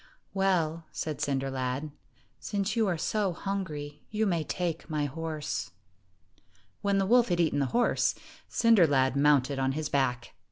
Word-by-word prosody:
"Well," 170 -4 +1
said 155 -2 -4
Cinder 135 -1 -1
lad, 130 +3 -3 0.5
"since 205 +1 -2
you 225 -2 +2
are 175 -3 0
so 200 +2 0
hungry, 155 -7 -4
you 220 +1 0
may 170 -5 +1
take 170 -1 -3
my 150 -2 0
horse." 155 +1 -4 1.1
When 200 -1 +1
the 195 - +2
wolf 240 +3 +5
had 175 -1 +1
eaten 160 -4 +2
the 140 - +1
horse, 240 - +2 0.3
Cinder 225 -7 +5
lad 130 -2 +2
mounted 140 -1 +3
on 135 0 +1
his 155 +1 -3
back. 125 -3 0
160 Hz, 155 wpm, -29 LUFS, 140-195 Hz, 1.1 s, wolf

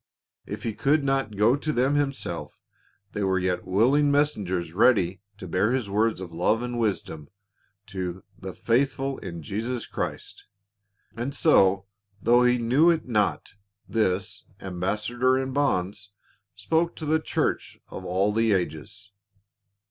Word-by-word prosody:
If - - -6
he 115 - -2
could 140 +8 +2
not 135 -5 0
go 110 +5 +4
to 155 +2 -2
them 130 +1 +1
himself 135 -12 -2 0.5
there 100 -1 -1
were 95 0 +2
yet 90 0 -1
willing 130 +10 +3
messengers 100 - 0
ready 95 -3 +3 0.2
to 95 -2 -8
bear 100 +7 +1
his 120 -7 -2
words 110 0 +1
of 85 -3 -8
love 105 +8 +1
and 120 -1 -3
wisdom 95 -9 -2 0.6
to 95 -3 -5
"the - - -8
faithful 135 +2 0
in 90 -2 -7
Christ 80 -3 -9
Jesus." 115 +4 -4 0.7
And 125 +5 -4
so, 95 -5 +4 0.3
though 120 +4 +4
he 125 0 +4
knew 130 +8 +4
it 165 -5 +1
not, 105 -4 0 0.3
this 95 -4 -1
"ambassador 105 +8 0
in 130 0 -2
bonds" 100 -8 0 0.5
spoke 165 +1 0
to 155 - -6
the 155 +1 +2
church - - -2
of - - -8
all 95 +3 0
the 115 -1 +2
ages. 85 +1 -4
110 Hz, 140 wpm, -26 LUFS, 95-130 Hz, 0.7 s, go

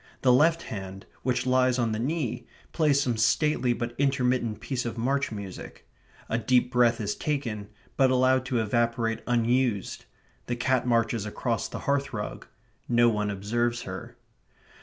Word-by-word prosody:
The 125 -2 +6
left 165 +5 +4
hand, 95 -2 -7 0.2
which 125 0 0
lies 130 0 +3
on 120 -3 +1
the 110 - -2
knee, 125 -3 -2 0.2
plays 150 -4 +3
some 125 -4 0
stately 125 +3 +2
but 120 0 -3
intermittent 125 -5 +1
piece 125 +1 -3
of 120 0 -5
march 135 +4 0
music. 100 -3 -8 0.4
A 115 - 0
deep 125 +1 +2
breath 120 -2 +3
is 105 -1 -1
taken; 115 -9 -3 0.3
but 135 -2 +5
allowed 130 0 +3
to 130 -2 0
evaporate 115 0 0
unused. 120 -3 0 0.4
The 120 - -1
cat 125 +1 0
marches 115 -2 +1
across 115 +1 -2
the - - -7
hearth 140 -1 0
rug. 105 -2 -5 0.4
No 120 0 +5
one 105 -2 -1
observes 120 +4 -1
her. - - -8
120 Hz, 155 wpm, -27 LUFS, 115-130 Hz, 0.4 s, The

